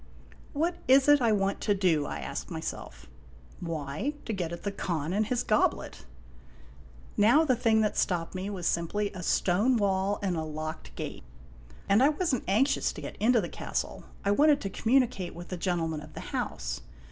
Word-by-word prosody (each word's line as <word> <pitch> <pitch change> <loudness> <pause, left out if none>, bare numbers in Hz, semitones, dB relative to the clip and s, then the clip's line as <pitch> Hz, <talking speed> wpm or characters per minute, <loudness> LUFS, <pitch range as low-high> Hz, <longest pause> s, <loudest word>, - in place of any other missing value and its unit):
"What 335 +4 0
is 265 +2 +6
it 290 -1 +6
I 230 -2 +3
want 195 -1 0
to 205 -1 +2
do?" 165 -7 +2
I - - -4
asked 65 - -5
myself. - - -6 0.5
"Why, 160 - -3
to 225 - -2
get 175 -4 -3
at 170 - -7
the 200 - -1
Khan 170 -4 -2
and 210 +1 +1
his 245 +1 0
goblet." 215 - 0 1.1
Now, 240 +10 +5
the 260 -4 +3
thing 225 -2 +3
that 210 - 0
stopped 170 -3 0
me 190 +2 -4
was 185 -4 -5
simply 200 +6 0
a 185 - -6
stone 200 +8 +2
wall 200 -1 +1
and 185 -3 0
a 160 - -1
locked 155 +1 -6
gate; - - -6 0.6
and 200 +4 +4
I 275 - +6
was 310 0 0
n't 255 - 0
anxious 220 +9 +2
to - - -8
get - - -7
into 230 +1 +3
the 175 - -3
castle. - - -4 0.2
1 200 +1 +2
wanted 295 -1 +5
to 195 - -4
communicate 230 -6 +1
with 175 +1 -9
the 180 - -4
orentleman 165 -3 -1
of - - -11
<_> - - -20
the - - -5
house. 65 0 -3
200 Hz, 195 wpm, -29 LUFS, 170-240 Hz, 1.1 s, is